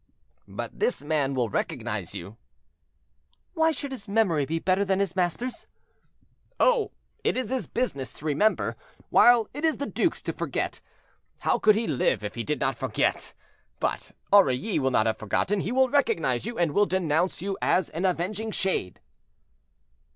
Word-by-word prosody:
"But - - -7
this 455 +4 +1
man 145 -3 0
will 125 -2 +1
recognize 105 - -3
you." 100 +6 -8 1.2
"Why 320 -1 +3
should 285 -3 -5
his 245 -5 -7
memory 195 -9 +2
be 165 - -1
better 185 +4 +1
than 190 -1 +1
his 195 -3 0
master's?" 190 +7 -2 0.9
"Oh! 485 -3 +3 0.3
it - - +1
is 255 0 -2
his 260 -1 -1
business 140 - -2
to 150 - -12
remember, 160 +9 +1 0.4
while 240 -3 +6
it 290 +4 -6
is 320 -1 +2
the 285 - -3
duke's - - -1
to - - -3
forget. - - -3 0.6
How - - +1
could 215 -1 +5
he 225 +2 0
live - - 0
if - - -4
he - - -4
did - - -2
not - - 0
forget? - - -1 0.4
But - - -2 0.2
Aurilly 185 - +4
will 135 -1 +1
not 115 -4 +2
have 110 - 0
forgotten; 180 - 0
he 190 - -2
will 260 +1 +4
recognize 165 - +1
you, 235 - -5
and 170 -3 +2
will 205 +6 +3
denounce 175 -1 0
you 195 0 -2
as 180 -3 +2
an 165 +4 -4
avenging 190 +5 -1
shade." 190 - -2
190 Hz, 165 wpm, -26 LUFS, 155-235 Hz, 1.2 s, while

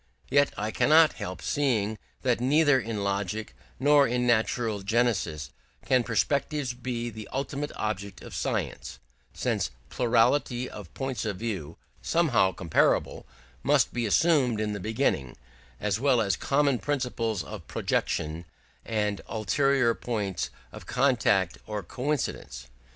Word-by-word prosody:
Yet 145 0 +4
I 105 +1 -2
cannot 155 +5 +5
help 90 +1 -5
seeing 110 -7 0 0.2
that 125 -2 +1
neither 145 +1 +4
in 110 -4 -3
logic 100 - -2 0.2
nor 145 +1 +5
in 125 +1 0
natural 115 -2 +1
genesis 100 - 0 0.3
can 130 -2 +4
perspectives 140 +3 0
be 120 -1 -4
the 110 -2 -9
ultimate 140 +2 -3
object 100 -2 -4
of - - -10
science, - - -3 0.3
since - - -1
a - - -17 0.2
plurality 125 +1 +2
of - - -10
points 135 -2 -3
of 105 -4 -3
view, 90 -8 -4 0.2
somehow 135 - +3
comparable, 85 -2 +1 0.3
must - - +3
be 120 -2 -1
assumed 135 -3 +3
in 105 -1 -1
the 100 - -4
beginning, 105 - -1 0.4
as 105 +1 0
well 135 -2 +3
as 100 -4 +1
common 140 +2 +1
principles 120 - -1
of 70 - -9
projection, 80 +3 -1 0.4
and 105 -3 -1
ulterior 130 +3 +2
points 105 -6 -3 0.2
of - - -11
contact 115 -9 +2
or 105 -2 -4
coincidence. 125 - -3
115 Hz, 130 wpm, -27 LUFS, 100-135 Hz, 0.4 s, cannot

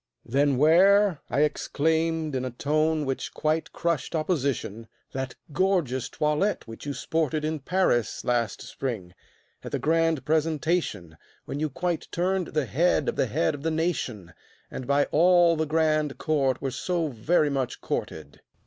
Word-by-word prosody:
"Then 140 +2 +2
wear," 185 +4 +5
I 145 - +1
exclaimed, 160 +1 0
in 130 - -1
a 130 - -2
tone 155 +4 0
which 135 -1 -4
quite 155 +1 -1
crushed 170 -1 -2
Opposition, 140 - -1 0.3
"that 130 -1 -4 0.2
gorgeous 155 -8 +1
toilette 150 +7 0
which 115 +5 -9
you 140 - -2
sported 155 +1 -1
In 155 0 -2
Paris 140 - 0
last 120 -3 0
spring, 105 -10 -5 0.5
at - - -7
the - - 0
grand 165 -3 +1
presentation, 155 - 0 0.3
When 140 - -5
you 155 0 0
quite 170 +4 -2
turned 185 0 0
the 150 -2 -1
head 155 +2 +2
of - - -3
the - - +1
head 155 +7 0
of 145 - -7
the 160 - 0
nation, 145 - -2 0.4
And 130 - -6
by 140 +1 +3
all 175 +1 +5
the 160 0 -1
grand 155 -2 +1
court 135 -5 0
were 135 - -1
so 170 +2 -1
very 145 +5 +1
much 135 -3 -2
courted." 75 -3 -5
155 Hz, 155 wpm, -26 LUFS, 130-165 Hz, 0.5 s, wear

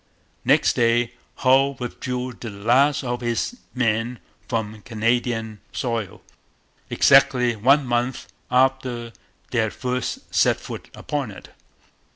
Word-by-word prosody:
Next - - +4
day 120 0 +2 0.3
Hull 135 +2 +5
withdrew 125 +1 -4
the 115 - -6
last 125 +8 +2
of 120 -1 -3
his 120 - -1 0.2
men 120 0 0 0.3
from 110 -2 -3
Canadian 115 -1 -1
soil, 115 -6 -3 0.7
exactly 125 -2 +4
one 135 +6 +4
month 120 +1 -1 0.2
after 125 -2 +1 0.4
they 120 - +1
had 110 -1 0
first 125 -1 -4
set - - +3
foot - - -8
upon 145 -5 -3
it. 95 - -11
120 Hz, 115 wpm, -23 LUFS, 115-130 Hz, 0.7 s, Hull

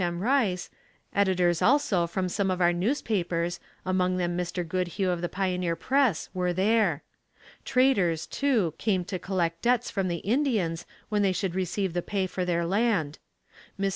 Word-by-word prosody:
M. 175 0 -2
Rice, 225 -8 +1 0.4
editors 180 -4 +2
also 235 -11 +3
from 185 +2 -2
some 195 +2 -1
of 185 -1 -1
our 175 -1 +4
newspapers, 175 -5 -1 0.3
among 185 -1 +1
them 175 -1 -1
Mr. 180 0 -3
Goodhue 185 +2 -1
of 175 -1 -2
the 175 - -2
Pioneer 180 -3 -1
Press, 255 - +1
were 180 -1 0
there. 190 -4 +2 0.6
Traders, 200 -12 +2
too, 235 - +1
came 190 -5 0
to 185 -1 -4
collect 170 -3 -1
debts 245 0 +1
from 195 -2 -1
the 170 -2 -4
Indians 210 - 0 0.2
when 210 -1 +1
they 195 -2 +3
should 185 -1 -2
receive 190 0 -1
the 175 - 0
pay 195 +1 -1
for 185 0 -3
their 170 -1 0
land. 190 -6 0 0.6
Mr. 195 0 +1
185 Hz, 165 wpm, -27 LUFS, 175-205 Hz, 0.6 s, our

